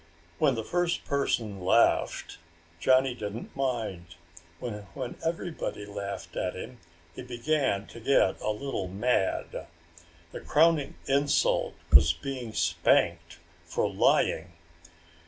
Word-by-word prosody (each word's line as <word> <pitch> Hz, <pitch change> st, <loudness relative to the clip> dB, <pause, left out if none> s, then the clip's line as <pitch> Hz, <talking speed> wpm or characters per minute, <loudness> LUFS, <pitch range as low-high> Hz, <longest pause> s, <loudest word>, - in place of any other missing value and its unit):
When 140 Hz, -4 st, +3 dB
the 110 Hz, -, -3 dB
first 175 Hz, +6 st, -1 dB
person 115 Hz, -7 st, -1 dB
laughed, 95 Hz, +6 st, +2 dB, 0.4 s
Johnny 130 Hz, +4 st, +4 dB
didn't 110 Hz, -1 st, -7 dB
mind. 110 Hz, -10 st, -3 dB, 0.4 s
But 105 Hz, -4 st, -6 dB
when 130 Hz, -3 st, -4 dB
everybody 165 Hz, -, -3 dB
laughed 100 Hz, -4 st, -6 dB
at 90 Hz, -, -2 dB
him 120 Hz, +6 st, -8 dB, 0.3 s
he -, -, -8 dB
began 125 Hz, -3 st, 0 dB
to 115 Hz, -, -11 dB
get 135 Hz, +4 st, +2 dB
a -, -, -1 dB
little 105 Hz, -3 st, -3 dB
mad. 100 Hz, +1 st, -1 dB, 0.6 s
The -, -, -7 dB
crowning 155 Hz, -2 st, +3 dB
insult 140 Hz, +1 st, +2 dB, 0.2 s
was 80 Hz, +3 st, +8 dB
being 120 Hz, +7 st, -5 dB
spanked -, -, +1 dB, 0.3 s
for -, -, -1 dB
lying. 85 Hz, +2 st, +2 dB
120 Hz, 115 wpm, -28 LUFS, 100-135 Hz, 0.6 s, was